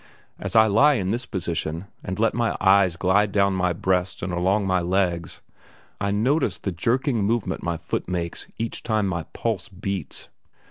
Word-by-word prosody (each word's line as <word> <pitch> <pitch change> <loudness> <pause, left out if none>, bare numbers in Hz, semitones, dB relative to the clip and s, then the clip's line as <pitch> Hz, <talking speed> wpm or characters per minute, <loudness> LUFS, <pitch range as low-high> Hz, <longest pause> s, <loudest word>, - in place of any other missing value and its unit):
As - - -3
I 110 0 +8
lie 125 +8 +5
in 95 -5 -1
this 120 +2 -2
position, 85 -2 -3 0.2
and 95 - -4
let 115 +1 +2
my 115 -1 0
eyes 95 -2 +4
glide 100 +3 +2
down 100 -1 +3
my 90 -1 +1
breast 90 +1 -1
and 90 -1 -2
along 95 +4 +1
my 95 -1 +2
legs, 90 -2 -1 0.6
I 100 - 0
notice 125 +10 +1
the 95 - -3
jerking 115 - 0
movement 115 +2 0
my 85 -1 -2
foot - - -4
makes 85 -2 -3
each 115 0 -3
time 110 -3 0
my 85 -3 -2
pulse 110 -6 -2
beats. 100 0 -5
95 Hz, 175 wpm, -24 LUFS, 90-110 Hz, 0.6 s, I